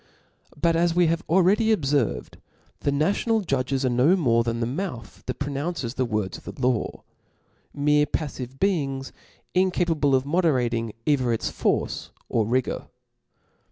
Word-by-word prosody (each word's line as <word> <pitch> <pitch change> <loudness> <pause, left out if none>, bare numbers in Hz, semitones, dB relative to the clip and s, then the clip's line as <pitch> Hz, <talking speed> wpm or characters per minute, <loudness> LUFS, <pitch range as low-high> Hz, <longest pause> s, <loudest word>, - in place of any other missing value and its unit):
But 165 +1 +3
as 170 0 +2
we 175 0 +5
have 165 +1 +1
already 190 +6 +4
ob 210 -9 +1
fcrved, 135 -4 0 0.4
the 140 - 0
national 200 +10 +1
judges 135 -5 -1
are - - +3
no 125 +9 +4
niorc 115 -9 +2
than 115 0 -1
the 115 - 0
mouth 135 -1 -5
that 125 - -3
pronounces 140 -2 -3
the 130 -1 0
words 105 -5 -2
of - - -24
the 125 - 0
law, 125 -4 -1 0.7
mere 150 +1 +2
paflive 135 -4 -4
beings, 140 -9 0 0.4
incapable 170 -6 +2
of 130 0 +1
moderating 125 - +1
either 130 -5 +2
its 115 - -1
force - - -1 0.2
pr - - +1
rigor. 120 +4 0
140 Hz, 150 wpm, -25 LUFS, 125-170 Hz, 0.7 s, we